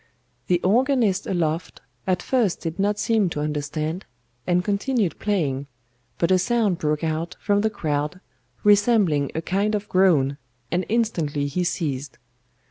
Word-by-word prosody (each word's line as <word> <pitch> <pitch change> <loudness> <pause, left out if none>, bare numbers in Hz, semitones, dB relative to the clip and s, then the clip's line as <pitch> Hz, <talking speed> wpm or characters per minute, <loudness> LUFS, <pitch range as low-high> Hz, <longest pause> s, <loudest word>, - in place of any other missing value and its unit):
The 175 -1 +3
organist 225 -2 +2
aloft 165 -2 -1 0.3
at 185 -1 +1
first 235 -9 +1
did 165 +2 -4
not 205 +1 +1
seem 215 -4 +2
to 150 - -4
understand, 150 +3 -3 0.4
and 180 0 +2
continued 205 -1 0
playing, 145 -10 -1 0.5
but 170 +1 +1
a 185 - +5
sound 210 -3 +1
broke 150 -1 -1
out 165 +2 -2
from 205 0 +1
the 220 - +2
crowd 150 -2 -2 0.4
resembling 205 - +4
a 160 - -2
kind 200 +5 0
of 210 0 -3
groan, 155 -8 +3 0.3
and 180 +1 0
instantly 170 -11 0
he 160 +6 -1
ceased. 145 -6 -3
180 Hz, 140 wpm, -23 LUFS, 155-205 Hz, 0.5 s, a